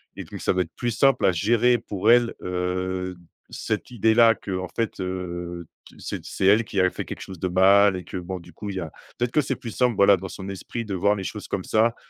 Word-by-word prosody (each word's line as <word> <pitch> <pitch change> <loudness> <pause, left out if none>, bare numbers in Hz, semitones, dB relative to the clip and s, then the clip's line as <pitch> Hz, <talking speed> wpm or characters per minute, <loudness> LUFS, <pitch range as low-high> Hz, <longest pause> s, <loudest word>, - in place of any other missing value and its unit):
et - - -6
donc - - -9
ça - - +1
va 90 - +1
être 80 -3 -5
plus 120 - -2
simple 135 +4 +3
à 95 - +5
gérer 120 +7 +3
pour 105 -1 +1
elle, 120 -1 +4
heu, 90 0 -2
d 85 - -20 0.3
cette - - -3
idée 110 -2 +2
là. 115 0 +6
Qu'en 95 -3 -4
fait, 115 -3 -2
heu, 85 -2 -5 0.2
tu - - -17
c'est - - -5
d - - -17
c'est 95 - -2
elle 105 +3 +5
qui 100 - -3
a 95 - +4
fait - - -5
quelque - - -7
chose 95 -3 -9
de 95 - -1
mal 95 +2 +5
et 90 - -5
que - - -7
bon 90 +1 -5
du 85 0 -15
coup 105 - -7
il 100 - -5
y - - -2
a 80 -4 -6 0.3
peut-être 120 0 -1
que 150 - +3
c'est 135 -1 -2
plus 115 - -8
simple 125 -2 +1
voilà 100 0 +6
dans 95 +2 -7
son 95 +1 -8
esprit 115 +4 -5
de 100 - -5
voir 100 +3 +2
les 95 - -5
choses 105 +2 -6
comme 95 - -3
ça, 115 +4 +2
95 Hz, 270 wpm, -24 LUFS, 90-115 Hz, 0.3 s, là